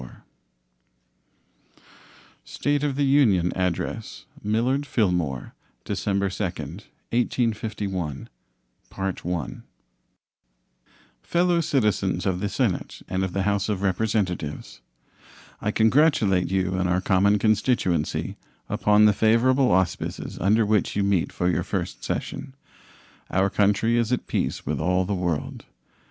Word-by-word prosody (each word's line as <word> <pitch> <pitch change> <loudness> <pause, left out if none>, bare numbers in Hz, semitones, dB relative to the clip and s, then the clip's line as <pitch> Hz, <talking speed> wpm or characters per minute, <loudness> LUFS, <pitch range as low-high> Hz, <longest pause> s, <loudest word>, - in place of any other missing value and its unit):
State 145 0 -1
of 145 -2 0
the 140 0 +1
Union 110 -11 +3
Address 90 -2 -3 0.2
Millard 120 +7 +1
Fillmore 90 - -1 0.3
December 100 -1 -1
2, 95 +2 -3 1.1
1851 95 -9 -4 2.9
Fellow 175 - +2
Citizens 105 - 0
of 95 -2 0
the 105 +1 -2
Senate 110 -5 -2
and 95 +1 -1
of 95 -2 -3
the 95 - 0
House 100 +1 0
of 100 -2 -2
Representatives: 95 - -2 0.8
I 105 - -1
congratulate 110 - +3
you 95 -1 0
and 95 -1 0
our 90 +1 +2
common 100 +2 +3
constituency 100 - 0 0.3
upon 105 0 +4
the 105 - +6
favorable 125 +5 +3
auspices 95 -1 -1
under 110 +3 +3
which 105 -1 +1
you 100 - +1
meet 100 -4 +1
for 90 - -1
your 90 - +1
first - - -4
session. 135 -1 -4 0.7
Our 95 +1 +1
country 105 +3 +2
is 115 0 +1
at 125 - 0
peace - - -2
with - - -2
all 90 +3 +1
the 100 - -2
world. 85 -6 -3
100 Hz, 115 wpm, -24 LUFS, 90-115 Hz, 2.9 s, the